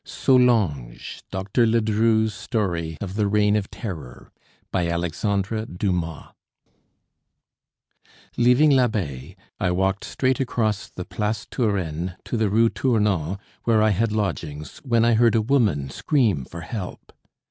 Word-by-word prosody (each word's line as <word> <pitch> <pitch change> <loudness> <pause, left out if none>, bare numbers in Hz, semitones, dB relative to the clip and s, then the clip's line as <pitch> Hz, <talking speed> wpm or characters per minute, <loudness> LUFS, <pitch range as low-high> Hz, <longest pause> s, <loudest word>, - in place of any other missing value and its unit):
SOLANGE 105 - +1
DR. 95 +5 0
LEDRU'S 110 -1 +2
STORY 90 -7 -2
OF 95 -2 -5
THE 105 0 +1
REIGN 105 0 +3
OF 105 -2 -1
TERROR 80 - -8 0.4
BY 90 -2 0
ALEXANDRE 100 +6 -1
DUMAS 90 -3 -3 2.1
Leaving 125 +5 +5
l'Abbaye, 95 - -1 0.2
I 95 -4 +1
walked 95 +2 0
straight 130 -1 0
across 110 -6 -1
the 90 - -7
Place 105 +1 -2
Turenne 90 - -1
to - - -3
the 110 -2 +1
Rue 115 +3 +4
Tournon, 105 - 0 0.3
where 110 -2 +4
I 110 - +4
had 110 +3 +1
lodgings, 85 -8 -3
when 115 -4 +2
I 120 - +4
heard 115 0 +4
a 110 - +4
woman 105 - +1
scream 110 - +1
for 85 +5 -9
help. 90 +2 -7
105 Hz, 125 wpm, -23 LUFS, 90-115 Hz, 2.1 s, Leaving